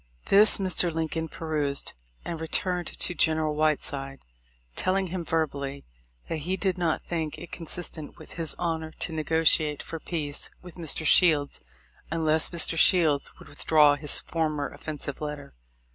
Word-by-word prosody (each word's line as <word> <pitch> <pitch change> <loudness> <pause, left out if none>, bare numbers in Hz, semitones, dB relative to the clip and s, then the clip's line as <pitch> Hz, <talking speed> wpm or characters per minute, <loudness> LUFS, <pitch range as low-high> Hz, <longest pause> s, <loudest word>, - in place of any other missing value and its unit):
This 205 +2 +6
Mr. 185 -2 +3
Lincoln 160 0 -2
perused, 150 -4 -2 0.3
and 165 -2 -4
returned 175 +2 0
to - - 0
General 155 -2 +1
Whiteside, 145 -3 -1 0.5
telling 190 +1 +1
him 180 0 -3
verbally, 140 -4 -2 0.4
that 165 - -2
he 180 +5 -2
did 190 -2 0
not 170 -3 -1
think 160 -3 -3
it 170 - -10
consistent 165 -2 -4
with - - -13
his 165 -2 +3
honor 160 -2 -2
to 165 - -3
negotiate 155 -1 +2
for 165 - -6
peace 150 -4 -1
with 180 -2 -11
Mr. 160 -1 -2
Shields, 150 -2 +4 0.5
unless 160 -1 +2
Mr. 165 -1 -1
Shields 155 -7 +4
would - - -14
withdraw 150 -2 +4
his 145 0 +1
former 155 -3 -2
offensive 145 -2 -6
letter. 150 -2 -6
160 Hz, 145 wpm, -27 LUFS, 150-170 Hz, 0.5 s, This